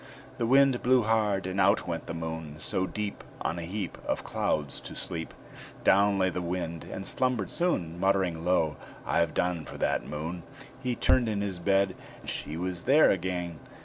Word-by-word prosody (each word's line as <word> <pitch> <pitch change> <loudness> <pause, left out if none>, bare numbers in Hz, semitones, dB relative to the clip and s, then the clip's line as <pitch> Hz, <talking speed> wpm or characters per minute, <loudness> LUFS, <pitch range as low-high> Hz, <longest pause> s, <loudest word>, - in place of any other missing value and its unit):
The 115 - +1
Wind 135 0 +5
blew 125 -1 +4
hard, 105 -3 +2
and 95 +1 0
out 100 +1 +3
went 85 -1 -3
the - - -4
Moon. 80 -2 -5
So, 95 +4 -1
deep 105 0 -4 0.2
On 85 - -1
a - - -4
heap 90 +2 -4
Of - - -2
clouds 70 -3 -1
to - - -9
sleep, 80 -1 -4 0.5
Down 100 +1 +5
lay 95 -1 +2
the 90 - -3
Wind, 85 -1 -3
and 95 - -5
slumbered 125 -7 0
soon, 90 - 0
Muttering 95 -4 +1
low, 85 -4 +2 0.3
"I've 85 -1 +1
done 90 -2 0
for - - -9
that - - +1
Moon." 80 +4 -4 0.4
He 125 -2 -1
turned 120 -1 +3
in 105 -2 -1
his 95 -3 -3
bed; 95 +1 +2 0.3
she 75 +2 -4
was 90 0 -3
there 145 +5 +6
again! 90 -2 -2
95 Hz, 180 wpm, -29 LUFS, 85-105 Hz, 0.5 s, there